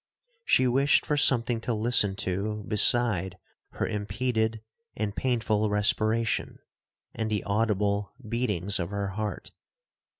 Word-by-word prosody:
She 130 - +3
wished 135 +3 +3
for 150 - 0
something 120 -4 +2
to 115 0 -2
listen 105 -3 +2
to 105 +3 -2
beside 105 -4 +2 0.4
her - - -2
impeded 110 +1 -2 0.3
and 105 -2 -2
painful 110 -4 0
respiration, 110 +2 +1 0.6
and 110 -1 -3
the 105 -2 -1
audible 100 -1 0 0.2
beatings 105 -5 -1
of 85 -1 -3
her 100 -1 -3
heart. 105 +1 -5
110 Hz, 120 wpm, -27 LUFS, 100-115 Hz, 0.6 s, She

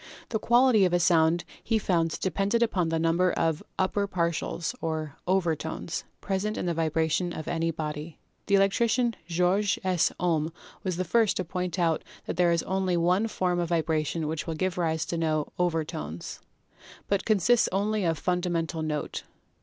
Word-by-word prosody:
The 220 - -1
Quality 240 -2 +5
of 180 - 0
a 175 - +4
sound 165 -1 +3 0.2
he 225 - +1
found 165 -6 0
depended 200 +5 +1
upon 185 -7 0
the 165 - 0
number 165 +3 +2
of 165 -2 0 0.2
"upper 200 +2 +1
partials," 170 0 -1
or 155 -3 -3
"overtones," 165 -2 -1 0.2
pres 190 -1 -1
ent 215 +1 -2
in - - -2
the 175 - 0
vibration 160 +2 0
of 155 - -6
any 165 0 0
body. 155 0 -5 0.3
The 200 - +4
electrician 230 +4 +2
Georg 180 +4 +2
S. 185 -3 +2
Ohm 165 -3 +1 0.3
was 185 -3 -2
the 185 - -1
first 205 +2 +2
to 185 - -2
point 180 +1 -3
out 165 -3 +1 0.2
that - - -3
there 175 0 +3
is 170 -1 +1
only 190 -1 0
one 180 +6 +2
form 180 -4 0
of 170 -1 -1
vibration 160 -1 0
which 155 +1 -3
will 165 - -2
give 180 +2 -1
rise 160 -2 0
to 170 - -3
no 155 -2 0
"overtones," 155 - -2 0.7
but 200 -1 +1
consists 225 +3 +3
only 205 +2 0
of 165 -2 +1
the - - -13
fundamental 175 -2 -1
note. 150 -1 -3
175 Hz, 175 wpm, -27 LUFS, 160-190 Hz, 0.7 s, Quality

